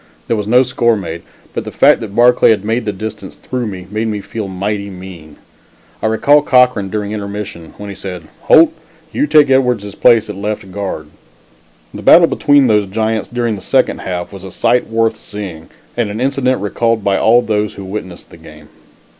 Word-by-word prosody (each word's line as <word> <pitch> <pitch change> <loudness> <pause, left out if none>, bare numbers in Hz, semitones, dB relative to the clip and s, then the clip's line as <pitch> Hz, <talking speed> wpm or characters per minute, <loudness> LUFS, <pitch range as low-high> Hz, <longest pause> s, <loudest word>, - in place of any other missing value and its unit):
There 115 - 0
was 105 -2 -3
no 125 +4 +5
score 120 -2 +1
made, 85 -4 -6 0.3
but - - -3
the - - -7
fact - - +4
that 105 -2 -8
Barclay 120 +1 +5
had 105 -3 +1
made 115 +3 -1
the 105 - -1
distance 105 0 -7
through 125 -2 -4
me, 95 -3 -7
made 110 +2 -2
me 105 -1 -2
feel 105 +1 -6
mighty 100 +2 -3
mean. 90 -5 -11 0.7
I 110 - 0
recall 145 +7 +4
Cochran 125 -8 +3
during 105 0 -3
the - - -4
intermission, 100 -5 -7
when 105 - -8
he - - -8
said: 90 -3 -7 0.2
"Holt; 165 +1 +6 0.4
you 290 +3 0
take 150 - +4
Edwards' 125 -6 +1
place 115 -1 +4
at 105 - -6
left 105 0 -5
guard." 95 -6 -5 0.8
The - - -8
battle 170 0 +7
between 145 -4 +3
those 105 -4 +2
giants 110 +2 -2
during 120 -2 -1
the 100 - -9
second 130 +5 +1
half 90 0 -5
was 95 -1 -10
a 95 - -8
sight 125 +6 0
worth 115 0 0
seeing 95 -7 -8 0.3
and 120 -3 -1
an 105 +2 -5
incident 130 -2 0
recalled 115 +2 0
by 100 -1 +1
all 120 +2 +4
those 105 -1 -1
who 100 - -8
witnessed 95 -3 -8
the - - -13
game. 75 -2 -15
105 Hz, 195 wpm, -15 LUFS, 95-120 Hz, 0.8 s, battle